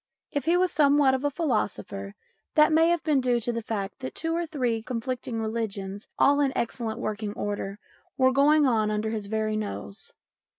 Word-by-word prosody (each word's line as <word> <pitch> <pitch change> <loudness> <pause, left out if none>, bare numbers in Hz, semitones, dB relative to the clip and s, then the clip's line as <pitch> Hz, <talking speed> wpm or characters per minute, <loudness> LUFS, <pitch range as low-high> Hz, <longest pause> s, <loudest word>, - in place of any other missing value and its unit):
If 285 - -2
he 340 +2 +4
was 365 0 +2
somewhat 285 -2 +4
of 265 +1 -1
a 290 - +2
philosopher, 205 - -2 0.4
that 305 0 +6
may 325 +1 +5
have 345 -1 +1
been 300 -4 +2
due 245 -1 +2
to 240 +2 -2
the 230 - -2
fact 205 -2 -4
that 260 - -6
two 330 0 -1
or 340 0 -1
three 245 -7 -1
conflicting 240 0 -4
religions, 210 -3 -4
all 285 +1 +4
in 280 -2 +2
excellent 230 -1 -2
working 215 -3 -3
order, 205 -1 -4 0.4
were 260 0 +4
going 290 +3 +5
on 220 -4 +2
under 215 +1 -1
his 215 -3 -3
very 215 0 -1
nose. 210 -1 -5
235 Hz, 185 wpm, -27 LUFS, 215-285 Hz, 0.4 s, that